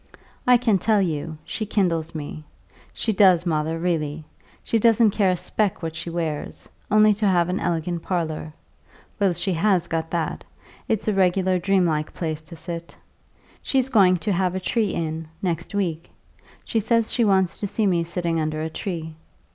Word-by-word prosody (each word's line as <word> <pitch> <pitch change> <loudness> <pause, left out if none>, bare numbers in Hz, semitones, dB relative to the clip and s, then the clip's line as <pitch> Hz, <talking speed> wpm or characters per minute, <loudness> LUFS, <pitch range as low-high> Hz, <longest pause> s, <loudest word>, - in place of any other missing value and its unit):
I 250 0 +7
can 225 -5 +2
tell 215 +2 +3
you, 160 -3 -2
she - - -3
kindles 165 -6 0
me; 155 0 -6 0.5
she 220 - -1
does, 185 -3 +5
mother, 160 -1 0
really. 160 -3 -2 0.4
She 230 - +1
doesn't 225 -1 +5
care 195 -2 +2
a 180 - +1
speck 200 +1 -1
what 160 -1 -4
she 170 +2 -5
wears 165 -3 -4 0.2
only 215 0 +5
to 210 +1 0
have 175 -2 +3
an 180 - -1
elegant 170 0 -1
parlour. 160 -4 -3 0.7
Well, 195 -3 +3
she 190 +2 -1
has 180 0 +2
got 165 -1 -3
that; 165 -2 -2 0.4
it's 220 -1 -1
a 215 - +2
regular 185 -1 +2
dream 190 0 +2
like 155 -2 -1
place 160 -2 -3
to 160 +2 -12
sit. 170 0 -7 0.6
She's 265 -1 0
going 190 -7 +5
to 210 - +1
have 185 0 0
a - - -1
tree 215 +2 0
in, 160 -1 -3
next 175 +1 -3
week; 170 -4 -2 0.6
she 225 - 0
says 225 +1 +1
she 240 - +2
wants 190 -4 +2
to 205 - -2
see 215 +2 0
me 175 -4 +2
sitting 170 -1 -2
under 155 0 -2
a 160 - -4
tree. 160 -2 -5
175 Hz, 180 wpm, -23 LUFS, 165-200 Hz, 0.7 s, I